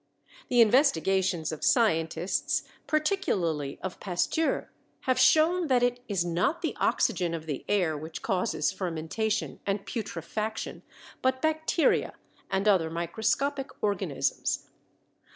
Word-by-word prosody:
The 245 -1 +5
investigations 190 - +3
of 155 - -6
scientists, 170 - +1 0.2
particularly 190 - 0
of 190 -1 -5
Pasteur, 195 - -1 0.3
have 255 -1 +1
shown 315 +7 +4
that 250 -3 +3
it 245 0 +1
is 190 -5 0
not 180 - 0
the 325 - -1
oxygen 175 -2 +1
of 160 -1 -7
the 145 -4 -4
air 180 -6 +2
which 160 +2 -7
causes 180 -5 0
fermentation 190 +4 -2
and 195 0 -2
putrefaction, 215 +1 -4 0.4
but 260 0 +1
bacteria 315 +1 +1 0.4
and 195 +1 0
other 180 -6 +4
microscopic 225 - -1
organisms. 205 -1 -1
200 Hz, 115 wpm, -28 LUFS, 170-260 Hz, 0.4 s, The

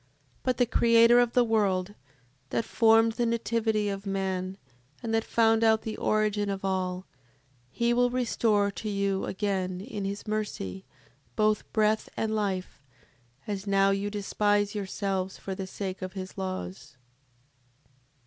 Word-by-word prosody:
7:23. - - -37 0.3
But 255 -2 0
the 245 - +4
Creator 230 0 +5
of 240 -1 +2
the 245 - +5
world, 205 -4 +1 0.6
that 230 - -1
formed 225 0 +4
the 240 +1 -1
nativity 225 -2 0
of 200 0 -4
man, 190 -1 -2 0.5
and 225 -1 -2
that 225 0 +2
found 225 -1 +3
out 220 -1 +4
the 220 - -4
origin 210 -1 0
of 195 0 -3
all, 185 -1 -1 0.6
he 235 - +1
will 245 0 +3
restore 225 -4 +1
to 215 +2 -5
you 200 -1 0
again, 190 -2 -2
in 205 0 -6
his 200 +1 -4
mercy, 200 - -3 0.5
both 215 -1 +1
breath 215 0 +1
and 220 -1 -1
life, 195 -7 -2 0.6
as 200 -1 -4
now 195 0 +4
you 200 +1 -1
despise 205 0 0
yourselves 195 -2 -3
for 195 - -5
the 190 0 -5
sake 190 -1 -5
of 185 0 -5
his 185 -1 -7
laws. 185 -6 -6
205 Hz, 150 wpm, -28 LUFS, 190-225 Hz, 0.6 s, Creator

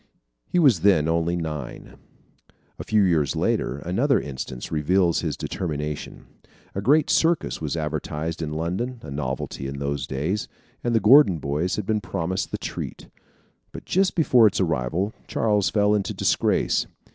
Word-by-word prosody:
He - - -1
was 135 - +5
then 80 -4 +4
only 85 +1 +1
nine. 75 -6 -6 0.8
A - - -4
few 105 -1 +2
years 80 -6 +2
later, 65 - 0
another 115 - +1
instance 65 -3 -6
reveals 85 +3 +2
his - - -3
determination. 75 -4 -4 0.5
A 100 - -3
great 145 +8 +4
circus 165 - +1
was 80 +1 -2
advertised 80 +1 -3
in 75 -1 -3
London, 90 +11 -3
a 70 - -8
novelty 65 -1 -4
in 70 0 -6
those 70 -1 -3
days, 80 +11 -2 0.4
and 120 -1 0
the - - +5
Gordon 115 - +6
boys 75 +5 -1
had 105 - -3
been 110 0 0
promised 90 +1 -3
the - - -3
treat. - - -6 0.6
But - - -9
just 190 +1 +1
before 125 -9 +5
its 100 - -1
arrival, 85 - -1
Charles 105 -3 +1
fell 105 -1 +2
into 105 -2 -1
disgrace. - - +1
85 Hz, 155 wpm, -24 LUFS, 75-105 Hz, 0.8 s, Gordon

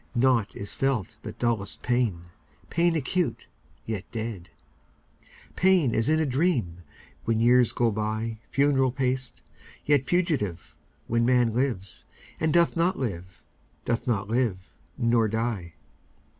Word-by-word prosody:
Naught 120 -4 +2
is 100 - -5
felt 135 -8 -1
but - - -8
dullest 115 -5 -2
pain, 120 -9 0 0.5
Pain 170 0 +2
acute, 165 +4 -1 0.4
yet 105 -4 -3
dead; 110 -6 -5 1.1
Pain 180 -9 +3
as 115 +5 +1
in 155 0 +3
a 160 - +2
dream, 130 - 0 0.4
When 115 0 +1
years 120 +1 +5
go 120 -2 +1
byFuneral 115 +5 0
paced, 130 -1 -2 0.4
yet 140 -3 +2
fugitive, 145 - -1 0.3
When 115 0 +1
man 120 -2 +3
lives, 115 -7 -2 0.3
and 160 0 +1
doth 170 +1 +3
not 175 +3 +1
live, 90 -8 -5 0.4
Doth 120 +1 -1
not 105 -5 0
live—nor 115 +1 0
die. 110 -7 -3
120 Hz, 120 wpm, -26 LUFS, 110-135 Hz, 1.1 s, years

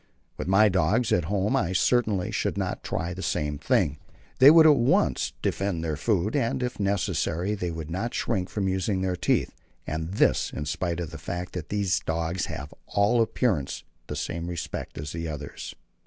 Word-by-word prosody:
With - - -5
my 100 +3 +6
dogs 100 +5 +2
at 85 - +2
home 100 +3 0
I 95 -1 +1
certainly 105 -2 +2
should - - -1
not - - -2
try 85 +3 -2
the 95 - -7
same 75 -5 -1
thing. 75 0 +1 0.4
They 135 - +10
would 160 +1 +8
at 155 -2 +8
once 120 - +2
defend 95 -4 -1
their 80 -2 -1
food, 105 - 0
and, 125 -2 0
if 125 -2 -3
necessary, 100 -1 0
they 90 -4 -2
would 80 -1 -6
not 115 +8 -3
shrink 95 -6 -1
from 100 -2 -1
using 95 +1 0
their 95 -1 0
teeth; - - +1 0.3
and 80 +3 -3
this - - +2
in 75 - -4
spite 85 +3 -2
of 85 -3 -4
the 80 - -8
fact 90 +2 -5
that 90 - -5
these 100 -3 +1
dogs 85 +2 -2
have 70 +3 -6
to - - -18
all 105 +4 +3
appearance 105 - 0 0.2
the - - -4
same 85 0 -3
respect 85 -2 -5
as 75 +1 -5
the 85 0 -4
others. 75 -2 -7
90 Hz, 190 wpm, -26 LUFS, 80-105 Hz, 0.4 s, They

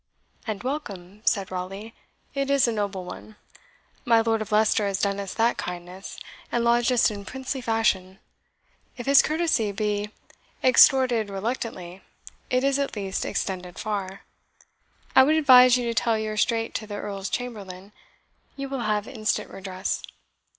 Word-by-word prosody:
"And 210 -2 -4
welcome," 210 -9 -5
said 195 -3 +1
Raleigh; 195 +5 -6 0.4
"it 275 -1 -2
is 280 -3 +4
a - - +1
noble 200 -4 -3
one. 215 +4 -10 0.7
My 230 -1 +4
Lord 225 -1 0
of 215 - -6
Leicester 215 0 +3
has 200 0 -2
done 200 0 0
us 195 -2 -5
that 230 +1 +2
kindness, 180 +2 -7 0.3
and 240 - +1
lodged 235 +1 +3
us 240 -2 +3
in 205 -1 -7
princely 265 +4 -5
fashion. 215 -5 0 0.8
If 245 - -6
his 275 0 +7
courtesy 310 -9 0
be 210 0 -2 0.5
extorted 255 -4 +5
reluctantly, 195 -3 -4 0.5
it 255 +1 +1
is 275 0 +2
at 280 -3 -2
least 195 -2 -3
extended 180 -2 -4
far. 200 -2 -4 0.9
I - - +9
would 295 +4 +4
advise 255 -5 +7
you 245 - -2
to 235 - -1
tell 230 -1 +1
your 215 0 -3
strait 225 +1 0
to 215 - -4
the 205 - -6
Earl's 200 -1 -5
chamberlain 200 -6 -6 0.6
you 275 -1 -5
will 270 -1 -3
have 210 0 0
instant 215 -4 -2
redress." 190 0 -4
215 Hz, 155 wpm, -25 LUFS, 195-250 Hz, 0.9 s, I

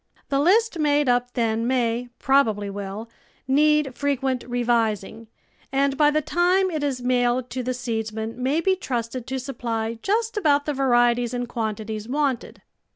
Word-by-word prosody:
The 275 - +1
list 385 +4 +3
made 295 -2 +2
up 245 0 +1
then 230 -1 0
may, 245 -1 0
probably 220 -7 +2
will, 200 +2 -6 0.4
need 300 -1 +3
frequent 270 -3 -1
revising, 230 -3 -1 0.4
and 275 0 +1
by 295 +1 +4
the 305 +1 0
time 360 +4 +2
it 310 -3 -2
is 265 -4 -2
mailed 245 0 +1
to 255 - -3
the 255 +1 -2
seedsman 225 -2 -4
may 280 +6 +1
be 380 +2 +2
trusted 245 -6 -4
to 265 0 -3
supply 230 -4 -3
just 445 +2 0
about 290 -7 +2
the 295 - -1
varieties 240 -2 +2
and 245 0 -3
quantities 220 -1 -4
wanted. 275 -3 -2
250 Hz, 155 wpm, -24 LUFS, 230-290 Hz, 0.4 s, by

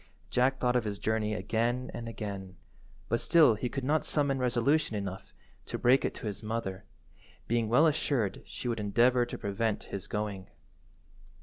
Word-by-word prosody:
Jack 130 +2 +2
thought 125 -1 +1
of 125 - +3
his 105 -2 -3
journey 110 +1 0
again 115 +5 -1
and 115 -1 -5
again, 100 -4 -6 0.5
but 115 - +1
still 160 -8 +5
he 115 +4 -3
could 135 +1 -4
not 150 +4 +2
summon 140 -3 +1
resolution 125 +2 +1
enough 95 -2 -5 0.4
to - - -3
break 125 +3 +4
it - - -2
to - - -8
his 105 -2 -4
mother, 105 -3 -4 0.6
being 115 -1 +1
well 125 +8 +5
assured 140 -9 0
she - - -6
would 115 -2 -1
endeavour 120 +4 +3
to - - -6
prevent 105 +2 -1
his 100 -2 -4
going. 100 -3 -3
115 Hz, 170 wpm, -30 LUFS, 105-125 Hz, 0.6 s, still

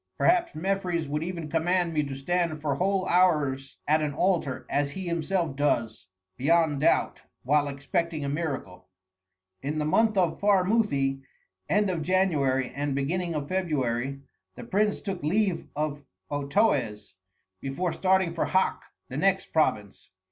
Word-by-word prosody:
Perhaps 345 -1 +2
Mefres 180 -2 -1
would 150 +2 -2
even 170 -2 -4
command 170 +2 +1
me 155 - +2
to 135 -1 -5
stand 165 +3 -1
for 150 -2 -1
whole 185 +5 0
hours 150 -7 +2
at 155 +1 +3
an 150 -2 -2
altar, 170 -7 0
as 145 0 0
he 190 -1 -5
himself 170 -2 -1
does, 115 -9 0 0.3
beyond 155 +1 +2
doubt, - - +2 0.2
while 145 +2 +2
expecting 145 +3 -2
a - - -2
miracle." 135 - -4 0.7
In 145 +3 -3
the 150 - 0
month 215 +8 +3
Pharmuthi 185 -6 +2 0.5
(end 205 0 +2
of 170 -3 -2
January 150 -8 +1
and 145 -1 -2
beginning 170 +5 -1
of 145 -2 -3
February) 135 -7 -1 0.3
the - - -8
prince 210 +1 0
took 195 -3 -4
leave 190 +4 0
of 150 -1 -2 0.3
Otoes, 140 - 0 0.5
before 155 - -2
starting 190 -2 +2
for 170 - 0
Hak, 190 0 +1 0.3
the 130 - -6
next 195 +4 +1
province. 105 -10 0
155 Hz, 140 wpm, -27 LUFS, 140-185 Hz, 0.7 s, at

